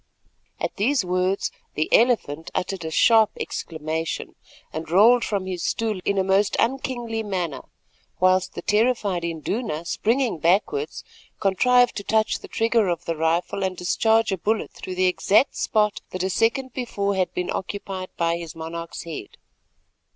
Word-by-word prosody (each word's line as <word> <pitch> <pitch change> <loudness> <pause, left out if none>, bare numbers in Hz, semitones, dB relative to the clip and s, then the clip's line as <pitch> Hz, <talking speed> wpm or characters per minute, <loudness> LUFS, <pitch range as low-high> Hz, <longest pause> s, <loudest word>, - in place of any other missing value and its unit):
At - - -3
these 230 +1 +2
words 185 +2 0 0.2
the 155 - 0
"Elephant" 185 - +2
uttered 185 -1 -2
a 160 - -3
sharp 220 +6 +5
exclamation, 160 0 -4 0.4
and 160 0 -5
rolled 225 +7 +6
from 200 -3 -1
his 185 -2 -4
stool 220 -4 -1
in 200 - 0
a 190 - +3
most 195 +2 +2
unkingly 240 -2 -1
manner, 180 -10 -3 0.6
whilst 185 0 +2
the - - -6
terrified 210 -5 +1
Induna, 170 +2 -3
springing 230 +1 0
backwards, 205 - +1 0.4
contrived 245 +5 +3
to 200 - -4
touch 220 +2 +1
the - - -11
trigger 225 -2 +2
of 170 -2 -2
the 165 - -1
rifle 165 +4 0
and 185 -1 -2
discharge 220 +5 +2
a 190 - -2
bullet 220 +4 -1
through 185 - -7
the 185 0 +2
exact 200 +7 +3
spot 210 -2 +1
that 185 0 -4
a 190 - 0
second 240 +5 +1
before 200 -5 -2
had 185 -2 0
been 180 - -2
occupied 190 -1 -4
by 170 0 +1
his 170 -2 -8
monarch's 165 +1 -6
head. 165 -10 -8
195 Hz, 155 wpm, -24 LUFS, 170-225 Hz, 0.6 s, rolled